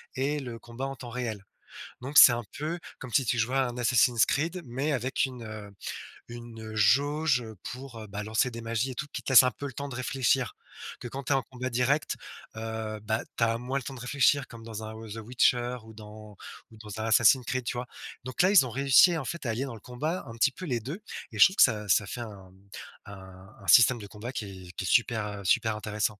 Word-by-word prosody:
et 145 +3 0
le 120 -4 -6
combat 120 +3 -6
en 135 - -5
temps 120 -1 -9
réel. 115 -5 -4 0.6
Donc, 140 +3 +2
c'est 125 - +11
un 120 0 -3
peu 160 +4 -3 0.2
comme 130 - -8
si 130 - +3
tu 120 +1 0
jouais 125 +4 0
un 125 -2 0
Assassin's 120 -1 +4
Creed, 165 +5 -1
mais 135 +5 -2
avec 130 +1 0
une, 125 -3 -6
heu, 110 -2 -8 0.6
une, 120 -1 -9
heu, - - -8
jauge, 140 +5 +3
heu, 110 -2 -9
pour, 125 -2 -8
heu, 110 - -9
bah, 100 +1 -5
lancer 110 +4 +1
des 115 -1 -8
magies 115 +3 -1
et - - -8
tout. 155 - -3
Qui - - -4
te - - -3
laisse 130 - +10
un 125 - +2
peu 145 - -6
le 130 - -9
temps 140 +2 -5
de 125 - -7
réfléchir. 130 0 0 0.4
Que - - -6
quand 135 +2 -6
tu 140 - +2
es - - +4
en 135 - 0
combat 130 0 -5
direct, 130 +5 +1 0.4
heu, 110 -1 -5
bah, 110 +1 -1 0.2
tu 115 - +2
as 115 0 +2
moins 130 +3 -3
le 135 - -3
temps 135 - -6
de 130 - -9
réfléchir 140 +2 +2
comme 115 -1 -12
dans 110 -1 -7
un 110 0 -7
Woz 110 0 -8
heu, - - -5
Witcher 125 +1 +1
ou 110 0 -13
dans 105 -1 -11 0.6
ou 110 - -15
dans 105 -1 -8
un - - -2
Assassin's 120 +3 +5
Creed, 130 0 -2
tu - - -2
vois? 125 - -3 0.4
Donc 130 +5 -1
là, 185 - +5
ils 185 -10 +7
ont - - -7
réussi, 140 +7 +5
en 135 - -4
fait, 170 +1 -5
à - - -1
allier 125 +5 -2
dans 130 - -6
le 110 - -11
combat 150 +9 -3
un 115 - -8
petit 135 +4 +3
peu 185 - -8
les 125 -6 -1
2 145 - -6 0.3
et - - -8
je - - +11
trouve 190 - +1
que - - +8
ça 105 -4 +2
ça 105 - +4
fait 120 - -5
un 100 -5 -9
mmh, 95 +1 -23 0.4
un 95 0 -12
un - - -13
système 120 0 +7
de 105 - -8
combat 110 +5 -7
qui 110 - -4 0.2
est - - -10
qui 95 - -5
est - - -2
super, 110 +1 +2
heu, - - -9
super 110 +4 +2
intéressant! 105 0 -1
120 Hz, 255 wpm, -28 LUFS, 110-135 Hz, 0.6 s, c'est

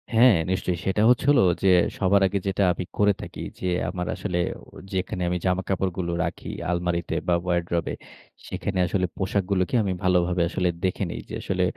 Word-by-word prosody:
হ্যাঁ, 120 -1 +7 0.2
নিশ্চয়ই। 90 -2 -1
সেটা 95 +2 +1
হচ্ছে 125 +1 +3
হলো 135 -4 +5 0.2
যে, - - +4 0.3
সবার 100 +1 +4
আগে 100 +1 -1
যেটা 95 +1 +1
আমি 90 - -4
করে 105 0 +4
থাকি। - - -8 0.2
যে - - -5 0.2
আমার 90 -1 -4
আসলে 90 - -3 0.2
ও - - -16 0.3
যেখানে 95 -1 -2
আমি 90 - 0
জামা-কাপড়গুলো 95 -1 -1
রাখি 85 0 -5 0.2
আলমারিতে 85 -1 -1
বা 90 - +3
ওয়ারড্রোবে। 85 -2 -1 0.5
সেখানে 95 -2 -3
আসলে 95 0 0
পোশাকগুলোকে 95 +1 0
আমি 95 -2 -1
ভালোভাবে 90 -1 +2
আসলে 90 -1 0
দেখে 95 +2 0
নেই। - - -5
যে - - -8
আসলে 95 -1 -1
95 Hz, 170 wpm, -25 LUFS, 90-95 Hz, 0.5 s, হ্যাঁ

